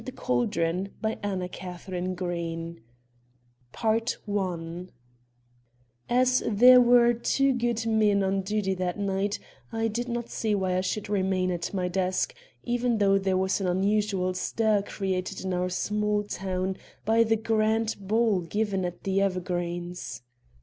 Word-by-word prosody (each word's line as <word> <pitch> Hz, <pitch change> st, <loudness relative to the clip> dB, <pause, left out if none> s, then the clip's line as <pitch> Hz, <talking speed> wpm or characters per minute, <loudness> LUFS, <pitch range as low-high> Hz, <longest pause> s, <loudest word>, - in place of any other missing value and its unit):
THE 260 Hz, -, -6 dB
RUBY 170 Hz, -, -1 dB
AND 200 Hz, -2 st, -2 dB
THE -, -, -3 dB, 2.2 s
CALDRON 190 Hz, -6 st, -2 dB, 1.2 s
As 255 Hz, +1 st, +3 dB
there 250 Hz, +4 st, +8 dB
were 240 Hz, 0 st, +6 dB
two 270 Hz, +3 st, +1 dB
good 240 Hz, -2 st, -1 dB
men 215 Hz, -3 st, +3 dB
on 195 Hz, 0 st, +1 dB
duty 195 Hz, 0 st, -1 dB
that 180 Hz, 0 st, -2 dB
night, 200 Hz, +1 st, -1 dB, 0.3 s
I 225 Hz, 0 st, 0 dB
did 240 Hz, +3 st, -3 dB
not 235 Hz, 0 st, -3 dB
see 215 Hz, -2 st, 0 dB
why 185 Hz, -2 st, 0 dB
I -, -, +1 dB
should 200 Hz, +2 st, -2 dB
remain 190 Hz, -2 st, +1 dB
at 170 Hz, -1 st, -3 dB
my 185 Hz, -2 st, -1 dB
desk, 185 Hz, 0 st, 0 dB, 0.3 s
even 245 Hz, -1 st, 0 dB
though 195 Hz, -1 st, +4 dB
there 190 Hz, -1 st, +1 dB
was 190 Hz, +1 st, 0 dB
an 190 Hz, -, 0 dB
unusual 195 Hz, 0 st, +1 dB
stir 215 Hz, +3 st, +1 dB
created 190 Hz, -1 st, -3 dB
in 190 Hz, -, -1 dB
our 180 Hz, 0 st, 0 dB
small 210 Hz, +2 st, 0 dB
town 190 Hz, -2 st, -3 dB, 0.3 s
by 225 Hz, +2 st, +4 dB
the 225 Hz, 0 st, +2 dB
grand 220 Hz, 0 st, +1 dB
ball 215 Hz, 0 st, +2 dB
given 200 Hz, +2 st, -1 dB
at 175 Hz, -1 st, -5 dB
The 195 Hz, 0 st, +1 dB
Evergreens. 175 Hz, -7 st, -3 dB
200 Hz, 135 wpm, -27 LUFS, 185-220 Hz, 2.2 s, there